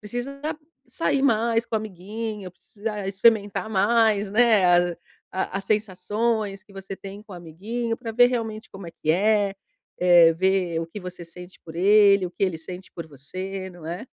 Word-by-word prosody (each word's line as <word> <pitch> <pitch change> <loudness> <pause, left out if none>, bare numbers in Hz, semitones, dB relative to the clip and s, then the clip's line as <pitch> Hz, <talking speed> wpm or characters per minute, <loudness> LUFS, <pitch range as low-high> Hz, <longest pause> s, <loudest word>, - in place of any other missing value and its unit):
precisa 245 +6 -6 0.5
sair 285 -4 0
mais 230 -2 +2
com 225 - -2
o - - +2
amiguinho, 210 0 -6
precisa 205 +2 -6
experimentar 205 +1 +2
mais, 210 0 +3
né, 220 -3 +4 0.3
a - - -12 0.4
a 190 +1 -2
as 195 - -7
sensações 210 0 -1
que 210 - -20
você 195 0 -7
tem 195 +2 -10
com 210 -3 -14
o - - -7
amiguinho. 220 +8 -4
Pra 230 -3 -6
ver 245 +2 +6
realmente 225 -3 -3
como 195 -2 -10
é - - -7
que 155 - -2
é. 200 +2 +2 0.4
Eh, 175 -2 +6
ver 185 -2 +1
o 165 - -4
que 190 +5 -8
você 180 -1 -8
sente 180 +2 -11
por 160 -1 -10
ele, 200 +1 +5
o 175 - -8
que 195 - -7
ele 175 -4 -2
sente 180 +3 -9
por 170 -2 -7
você, 185 +7 -6
não 175 -3 -12
é? 180 +9 -5
200 Hz, 180 wpm, -24 LUFS, 180-220 Hz, 0.5 s, ver